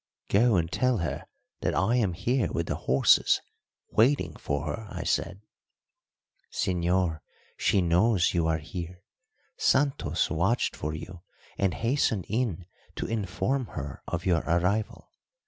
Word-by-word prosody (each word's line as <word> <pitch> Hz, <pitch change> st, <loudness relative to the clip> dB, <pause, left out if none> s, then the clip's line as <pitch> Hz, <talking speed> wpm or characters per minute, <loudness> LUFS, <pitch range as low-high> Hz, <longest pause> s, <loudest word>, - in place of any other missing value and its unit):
"Go 115 Hz, +2 st, +4 dB
and 85 Hz, -1 st, 0 dB
tell 125 Hz, +2 st, +2 dB
her 85 Hz, -6 st, -3 dB, 0.3 s
that -, -, -1 dB
I 110 Hz, +6 st, +2 dB
am 105 Hz, -7 st, +1 dB
here 115 Hz, +7 st, 0 dB
with 85 Hz, -, -1 dB
the -, -, -2 dB
horses 65 Hz, +1 st, +5 dB, 0.5 s
waiting 110 Hz, -, +2 dB
for 70 Hz, +2 st, -3 dB
her," 95 Hz, +9 st, -4 dB
I -, -, -5 dB
said. 85 Hz, +3 st, -1 dB, 1.1 s
"Señor, 90 Hz, -2 st, 0 dB, 0.4 s
she 95 Hz, -, +2 dB
knows 90 Hz, +3 st, +3 dB
you 85 Hz, -2 st, +1 dB
are 80 Hz, -1 st, +2 dB
here. 90 Hz, +3 st, -7 dB, 0.5 s
Santos 140 Hz, +1 st, +1 dB
watched 95 Hz, +9 st, +1 dB
for 75 Hz, +1 st, -4 dB
you 90 Hz, +2 st, -8 dB, 0.3 s
and 95 Hz, -4 st, 0 dB
hastened 115 Hz, -, 0 dB
in 105 Hz, -6 st, -1 dB, 0.3 s
to -, -, -3 dB
inform 115 Hz, +4 st, -1 dB
her 70 Hz, -2 st, -5 dB
of 85 Hz, 0 st, -3 dB
your 90 Hz, -3 st, +3 dB
arrival. 90 Hz, +6 st, 0 dB
90 Hz, 135 wpm, -28 LUFS, 85-110 Hz, 1.1 s, horses